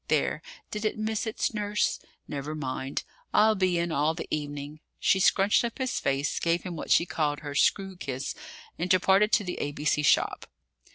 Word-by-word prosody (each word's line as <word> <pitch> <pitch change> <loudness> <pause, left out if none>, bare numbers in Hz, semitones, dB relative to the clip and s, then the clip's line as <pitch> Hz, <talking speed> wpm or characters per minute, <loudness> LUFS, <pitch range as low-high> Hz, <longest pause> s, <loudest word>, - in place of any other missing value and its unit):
There! - - +1 0.3
did 210 0 -4
it 215 - 0
miss 220 +1 -2
its 220 - -1
nurse? 210 -1 0 0.3
Never 145 +1 -4
mind! 135 -2 -3 0.3
I'll 220 +1 +6
be 185 -3 +1
in 170 0 -1
all 155 +2 +1
the 165 - -6
evening." 145 0 -4 0.2
She 190 - +3
scrunched 195 +3 +4
up 235 -1 -3
his 260 -1 -1
face, 135 +1 0
gave 170 +1 +1
him 180 -2 -5
what 155 - -6
she 170 - +5
called 150 -2 -1
her 145 -2 -6
"screw" 195 +5 +1
kiss, 135 -4 -4 0.5
and 175 +2 -1
departed 190 +3 +4
to 210 - +4
the 180 -2 -4
A.B.C. 145 +1 0
shop. 150 - +2
170 Hz, 180 wpm, -28 LUFS, 145-205 Hz, 0.5 s, I'll